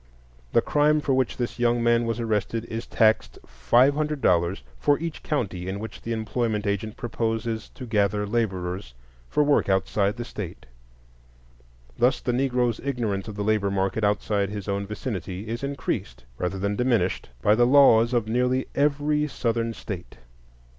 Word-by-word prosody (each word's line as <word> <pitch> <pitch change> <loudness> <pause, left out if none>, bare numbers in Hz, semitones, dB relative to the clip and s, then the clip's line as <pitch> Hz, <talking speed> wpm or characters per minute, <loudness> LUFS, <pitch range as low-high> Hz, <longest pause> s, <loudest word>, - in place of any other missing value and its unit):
The - - +4
crime 150 +1 +3
for 145 -2 0
which 130 -2 0
this 120 0 -3
young 120 0 +2
man 120 0 +3
was 115 0 -2
arrested 110 0 -1
is 115 0 -5
taxed 110 -1 +2
five 120 - +3
hundred 150 0 -1
dollars 85 - +2 0.2
for 145 -1 +3
each 165 -1 -5
county 95 - -2
in 95 +1 -3
which 110 +1 -8
the 115 - -5
employment 110 -1 -1
agent 100 +2 -2
proposes 115 -1 -2
to 130 - -7
gather 105 -2 +1
laborers 95 - -2 0.3
for 150 - +2
work 145 -7 +2
outside 100 +2 +1
the 120 - -4
State. 100 -7 -7 1.3
Thus 125 +2 +3
the 125 - -1
Negroes' 125 -2 +1
ignorance 115 -8 -2
of 105 - -6
the 105 - -2
labor 105 -1 +1
market 95 +2 -1
outside 105 -1 +1
his 105 -1 -6
own 100 0 -2
vicinity 105 -3 -5
is 115 +3 -4
increased 140 - -3
rather 90 +2 -2
than 100 +2 -1
diminished 115 - 0
by 105 - +5
the 120 +2 +4
laws 125 -4 +6
of 120 -3 +1
nearly 125 +3 +1
every 150 +1 +1
Southern 115 -4 -1
State. 100 -5 -7
115 Hz, 160 wpm, -25 LUFS, 100-125 Hz, 1.3 s, laws